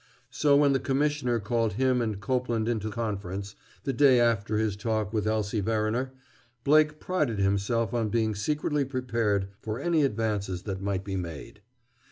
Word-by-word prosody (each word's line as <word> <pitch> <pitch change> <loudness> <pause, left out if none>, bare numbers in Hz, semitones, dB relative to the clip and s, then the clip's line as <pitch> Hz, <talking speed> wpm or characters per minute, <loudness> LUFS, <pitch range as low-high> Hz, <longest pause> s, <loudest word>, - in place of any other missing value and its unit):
So 145 -1 +3
when 145 -1 +4
the 135 - +2
Commissioner 135 -2 0
called 115 +1 0
him 130 +2 +2
and 110 -4 -2
Copeland 120 0 -1
into 110 -2 -1
conference, 100 -3 -4 0.3
the 135 - -1
day 130 -1 +5
after 110 -2 +2
his 110 -2 0
talk 110 0 -2
with 110 -1 0
Elsie 110 0 0
Verriner, 110 +4 0 0.5
Blake 150 +1 +4
prided 150 - -1
himself 100 +4 +1
on 115 -3 0
being 110 0 +1
secretly 150 +7 0
prepared 115 -7 -1
for 110 +2 -4
any 165 +1 +2
advances 105 -7 -1
that 95 -2 -4
might 100 -1 -2
be 100 -1 -4
made. 85 +2 -7
115 Hz, 160 wpm, -28 LUFS, 100-130 Hz, 0.5 s, day